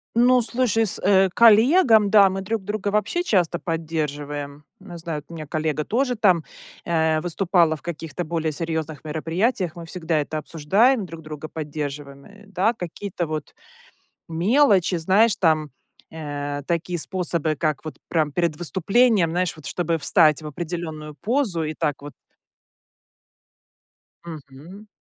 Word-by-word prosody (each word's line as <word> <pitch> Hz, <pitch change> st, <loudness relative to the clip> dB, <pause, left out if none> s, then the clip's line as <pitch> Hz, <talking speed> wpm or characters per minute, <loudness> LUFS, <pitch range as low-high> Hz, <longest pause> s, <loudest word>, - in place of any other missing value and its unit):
Ну, 250 Hz, +2 st, +5 dB
слушай, 230 Hz, -1 st, +1 dB
с, 190 Hz, -, -4 dB
э, 195 Hz, 0 st, +4 dB
коллегам, 230 Hz, -, +6 dB
да, 200 Hz, -2 st, +6 dB
мы 190 Hz, +1 st, -4 dB
друг 215 Hz, +1 st, -3 dB
друга 210 Hz, 0 st, -4 dB
вообще 210 Hz, -, 0 dB
часто 175 Hz, -, +1 dB
поддерживаем. 150 Hz, -3 st, -4 dB, 0.2 s
Не 185 Hz, -3 st, -10 dB
знаю, 160 Hz, -3 st, -5 dB
у 170 Hz, -, -12 dB
меня 155 Hz, -2 st, -7 dB
коллега 155 Hz, -1 st, -1 dB
тоже 250 Hz, +2 st, 0 dB
там, 185 Hz, -7 st, +3 dB, 0.4 s
э, 160 Hz, -2 st, +1 dB
выступала 175 Hz, -2 st, +2 dB
в 155 Hz, -, -13 dB
каких-то 165 Hz, -1 st, -5 dB
более 160 Hz, -1 st, -2 dB
серьезных 160 Hz, -1 st, -4 dB
мероприятиях. 165 Hz, +5 st, -1 dB
Мы 170 Hz, -1 st, -8 dB
всегда 165 Hz, -2 st, -2 dB
это 155 Hz, +1 st, -3 dB
обсуждаем, 195 Hz, -, +2 dB
друг 165 Hz, -2 st, -10 dB
друга 155 Hz, 0 st, -8 dB
поддерживаем, 145 Hz, -2 st, -6 dB
э, 205 Hz, 0 st, -16 dB
да, 200 Hz, +4 st, +1 dB
какие-то 175 Hz, -2 st, -5 dB
вот 155 Hz, 0 st, -5 dB, 0.7 s
мелочи, 190 Hz, -, +3 dB
знаешь, 195 Hz, +7 st, +3 dB
там, 155 Hz, -4 st, +1 dB, 0.4 s
э, 145 Hz, -2 st, -4 dB
такие 170 Hz, 0 st, -1 dB
способы, 170 Hz, -3 st, -2 dB
как 155 Hz, -1 st, -2 dB
вот 155 Hz, -, -6 dB
прям 155 Hz, -3 st, +1 dB
перед 170 Hz, -3 st, 0 dB
выступлением, 190 Hz, +2 st, +2 dB
знаешь, 180 Hz, 0 st, -1 dB
вот 155 Hz, -3 st, -14 dB
чтобы 165 Hz, +3 st, -1 dB
встать 155 Hz, 0 st, +3 dB
в 155 Hz, -, -7 dB
определенную 155 Hz, -1 st, -6 dB
позу 220 Hz, -, -1 dB
и 155 Hz, 0 st, -3 dB
так 150 Hz, -3 st, -2 dB
вот 145 Hz, -1 st, -9 dB, 2.1 s
Мгм. 160 Hz, +6 st, -11 dB
170 Hz, 140 wpm, -23 LUFS, 155-200 Hz, 2.1 s, коллегам